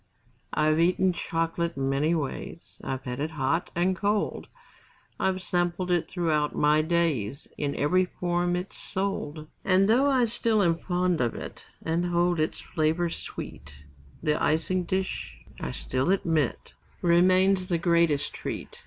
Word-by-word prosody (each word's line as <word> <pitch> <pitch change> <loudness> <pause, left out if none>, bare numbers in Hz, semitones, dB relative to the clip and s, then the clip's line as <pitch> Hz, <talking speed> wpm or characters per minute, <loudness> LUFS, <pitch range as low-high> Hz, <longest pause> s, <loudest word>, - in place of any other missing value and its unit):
I've 155 +1 +2
eaten 180 +2 +3
chocolate 165 0 -2
many 135 +4 +1
ways, 155 +2 -5
I've 130 0 -3
had 125 0 -5
it 150 +2 -1
hot 155 +2 -1
and 180 +2 +2
cold; 205 +2 -1 0.7
I've 190 -1 0
sampled 175 0 -1
it 175 -2 +1
throughout 155 -4 0
my 150 +1 +4
days 155 -7 0
In 145 -1 -2
every 185 +6 +2
form 175 0 -1
it's 180 +2 -4
sold. 185 -6 -3 0.2
And 190 +1 +4
though 255 +6 +4
I 260 -3 +4
still 225 -2 +1
am 165 -2 +2
fond 180 -2 0
of 120 -2 0
it, - - -8 0.2
And 170 +2 0
hold 175 -1 +2
its 155 - -1
flavor 160 +1 0
sweet, 70 - -8 0.5
The 150 -2 +1
icing 175 +3 +1
dish, 190 - -3 0.2
I - - -3
still 130 - -2
admit, 165 -8 0 0.3
Remains 185 +2 +4
the 175 -3 +1
greatest 170 -4 +2
treat. - - -6
170 Hz, 145 wpm, -27 LUFS, 155-185 Hz, 0.7 s, my